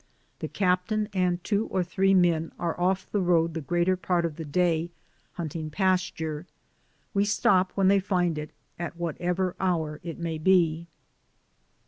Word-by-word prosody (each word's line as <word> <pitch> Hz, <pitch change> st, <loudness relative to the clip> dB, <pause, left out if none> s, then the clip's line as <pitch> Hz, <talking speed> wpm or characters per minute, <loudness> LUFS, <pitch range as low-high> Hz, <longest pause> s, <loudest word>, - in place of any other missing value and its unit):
The -, -, -3 dB
captain 200 Hz, +3 st, 0 dB
and 180 Hz, -2 st, 0 dB
two 210 Hz, 0 st, 0 dB
or 185 Hz, -, 0 dB
three 195 Hz, +2 st, +2 dB
men 170 Hz, -3 st, +2 dB
are 170 Hz, -1 st, -2 dB
off 190 Hz, +1 st, +1 dB
the 205 Hz, -, +1 dB
road 170 Hz, -2 st, +2 dB
the 160 Hz, -, -3 dB
greater 175 Hz, +5 st, +1 dB
part 175 Hz, -1 st, 0 dB
of 160 Hz, -3 st, -3 dB
the 165 Hz, -, -6 dB
day 165 Hz, +2 st, +1 dB, 0.4 s
hunting 160 Hz, -2 st, -4 dB
pas 185 Hz, +3 st, +1 dB
ture; 160 Hz, +1 st, -5 dB, 0.7 s
we 200 Hz, -, +3 dB
stop 190 Hz, -2 st, +2 dB
when 195 Hz, -1 st, +3 dB
they 200 Hz, +1 st, +5 dB
find 180 Hz, -4 st, 0 dB
it 150 Hz, 0 st, -6 dB, 0.3 s
at 170 Hz, 0 st, -5 dB
whatever 175 Hz, +2 st, -1 dB
hour 160 Hz, -5 st, -1 dB
it 165 Hz, -1 st, -6 dB
may 165 Hz, -2 st, -3 dB
be. 170 Hz, -1 st, +3 dB
175 Hz, 160 wpm, -27 LUFS, 165-185 Hz, 0.7 s, they